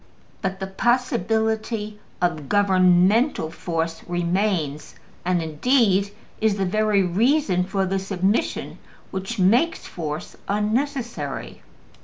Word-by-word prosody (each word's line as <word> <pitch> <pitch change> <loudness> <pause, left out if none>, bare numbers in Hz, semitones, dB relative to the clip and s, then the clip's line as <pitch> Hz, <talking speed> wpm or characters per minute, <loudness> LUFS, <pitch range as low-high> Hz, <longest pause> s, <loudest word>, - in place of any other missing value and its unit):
But 190 -1 -2
the 190 - -3
possibility 220 -1 0 0.2
of 155 -6 -1
governmental 190 - +3
force 165 -1 -3
remains, 175 -3 -1 0.3
and 180 -1 +1
indeed 200 - +2 0.3
is 220 -2 +2
the 195 - 0
very 210 +1 +2
reason 200 - +2
for 195 0 0
the 190 +1 -1
submission 195 +2 -1 0.3
which 190 +5 -4
makes 235 - +2
force 155 -2 -5
unnecessary. 220 - -2
195 Hz, 100 wpm, -23 LUFS, 175-220 Hz, 0.3 s, governmental